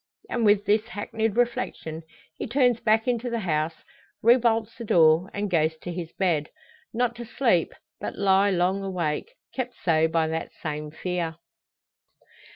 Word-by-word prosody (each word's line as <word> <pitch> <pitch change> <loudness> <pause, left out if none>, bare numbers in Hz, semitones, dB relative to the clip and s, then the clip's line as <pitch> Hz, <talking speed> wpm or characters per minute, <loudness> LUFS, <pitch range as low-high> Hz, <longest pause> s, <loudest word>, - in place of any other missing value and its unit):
And 235 -2 +1
with 205 0 +4
this 210 +2 +2
hackneyed 220 -1 -2
reflection 235 -9 -1 0.3
he - - -5
turns 245 -1 +3
back 220 +1 +2
into 245 0 0
the 235 -1 -2
house, 160 -3 -1 0.4
rebolts 230 -1 +3
the 235 - -7
door, 165 -2 +4
and 205 +1 -2
goes 160 -3 +1
to 175 +2 -6
his 170 -1 -5
bed; 165 -6 0 0.4
not 240 +1 0
to 240 - -6
sleep, 230 -7 +1 0.3
but - - -5
lie 195 0 +4
long 185 +1 +1
awake 185 - -3 0.2
kept 250 -2 -4
so 160 -2 +4
by 160 0 +1
that 160 0 -4
same 150 -1 -3
fear. 170 +1 -3
195 Hz, 155 wpm, -26 LUFS, 165-230 Hz, 0.4 s, with